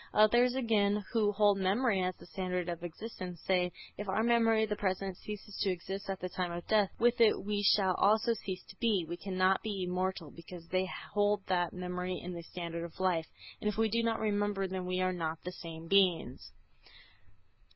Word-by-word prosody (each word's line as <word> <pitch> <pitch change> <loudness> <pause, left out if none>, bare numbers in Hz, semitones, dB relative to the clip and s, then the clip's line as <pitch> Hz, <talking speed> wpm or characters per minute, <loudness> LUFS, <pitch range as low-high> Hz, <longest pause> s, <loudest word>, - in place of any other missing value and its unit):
Others, 240 +4 +5
again, 210 -5 +2
who 215 -3 +3
hold 205 -1 +3
memory 195 +2 +2
as 185 0 -1
the - - -15
standard 180 -1 -3
of 170 -1 -4
existence, 180 -1 -7
say, 180 -1 +2 0.3
if 205 -1 -4
our 215 +3 +1
memory 225 -2 +4
of 220 - -1
the 210 - 0
present 190 -1 -2
ceases 210 +1 -8
to 200 - +2
exist 190 +2 -4
at 190 -1 -2
the 185 - -3
time 180 -1 -3
of 170 0 -5
death, 210 -3 +3
with 240 0 +3
it 225 - +5
we 205 0 -1
shall 195 -2 +4
also 220 +3 +4
cease 190 -4 -6
to - - -13
be; 215 -7 +1
we 170 - -4
cannot 185 +1 +1
be 205 -4 -3
immortal; 180 -3 -2
because 170 0 -11
they 185 0 +1 0.3
hold 205 -1 +2
that 175 -2 +1
memory 180 0 -3
is 180 +1 -6
the 170 - -6
standard 170 0 -5
of 170 +2 -9
life, 175 -4 +1 0.3
and - - -1
if 210 - -4
we 225 0 +2
do 230 +2 +1
not 230 -1 0
remember 205 -2 0
then 185 -1 -4
we 185 0 0
are 185 0 +1
not 165 -2 -2
the 180 - -4
same 165 -2 -9
beings. 180 -9 +2
190 Hz, 205 wpm, -32 LUFS, 180-210 Hz, 0.3 s, Others